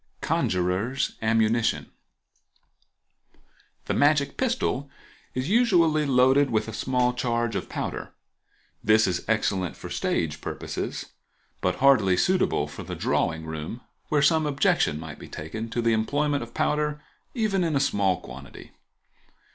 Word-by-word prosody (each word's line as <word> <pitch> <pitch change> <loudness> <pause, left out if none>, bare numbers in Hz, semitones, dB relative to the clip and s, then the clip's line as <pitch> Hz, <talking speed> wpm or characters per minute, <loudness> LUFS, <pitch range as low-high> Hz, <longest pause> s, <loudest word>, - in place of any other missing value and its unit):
Conjurer's 95 +9 0
Ammunition.—The 110 +1 -4
magic 145 -1 +3
pistol 230 - -1 0.5
is 130 +2 -2
usually 170 -9 +3
loaded 135 +2 +4
with 110 -1 0
a 110 - -6
small 125 +1 +1
charge 120 -2 -1
of - - -3
powder. - - -4 0.7
This 110 +1 +5
is 90 -1 -1
excellent 100 -5 0
for - - -9
stage 75 -2 -1
purposes, - - -4 0.6
but - - +1
hardly 110 -9 +4
suitable 185 - +2
for - - -9
the - - -6
drawing 80 -1 0
room, 80 +9 -6 0.3
where 150 -1 +2
some 160 -1 +3
objection 140 - +2
might 80 -2 -8
be - - -10
taken 110 +9 -6
to 115 +1 -2
the 115 0 +3
employment 145 +6 0
of 120 0 -9
powder, 150 0 0 0.4
even 210 -5 +1
in 165 -3 0
a - - +3
small 100 -9 +1
quantity. 70 0 -11
120 Hz, 130 wpm, -26 LUFS, 100-145 Hz, 0.7 s, This